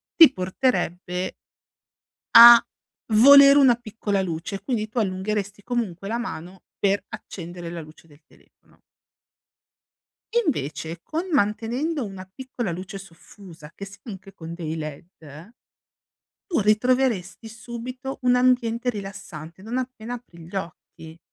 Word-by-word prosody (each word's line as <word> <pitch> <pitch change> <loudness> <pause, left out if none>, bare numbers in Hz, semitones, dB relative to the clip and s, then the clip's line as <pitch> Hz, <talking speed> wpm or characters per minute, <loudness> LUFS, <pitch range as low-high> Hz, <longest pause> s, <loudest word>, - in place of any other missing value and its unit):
ti 325 -3 +9
porterebbe 185 -2 -2 1.0
a 235 0 +11 0.5
volere 280 +5 +8
una 265 -4 +6
piccola 215 -4 -3
luce. 180 +2 -5
Quindi 225 -5 -2
tu 235 +3 -3
allungheresti 205 0 -3
comunque 210 -7 -3
la 225 +3 -2
mano 190 -6 -7
per 200 0 +1
accendere 175 -1 -8
la 170 -1 -6
luce 155 +1 -16
del 150 0 -21
telefono. - - -27 1.7
Invece, 160 - -3
con 320 - -4
mantenendo 245 +5 0
una 195 -2 -8
piccola 245 -4 -5
luce 185 +3 -7
soffusa 170 -3 -14
che 200 - -8
sia 195 0 -13
anche 195 -4 -10
con 165 0 -9
dei 165 -2 -5
led, 155 0 -7 1.4
tu 350 -9 -1
ritroveresti 225 -1 +1
subito 245 +3 -7
un 250 0 +4
ambiente 250 -1 +1
rilassante, 195 -6 -8
non 225 +5 -4
appena 245 -2 -5
apri 230 -8 -14
gli 175 - -12
occhi. 165 -2 -9
205 Hz, 120 wpm, -23 LUFS, 180-245 Hz, 1.7 s, a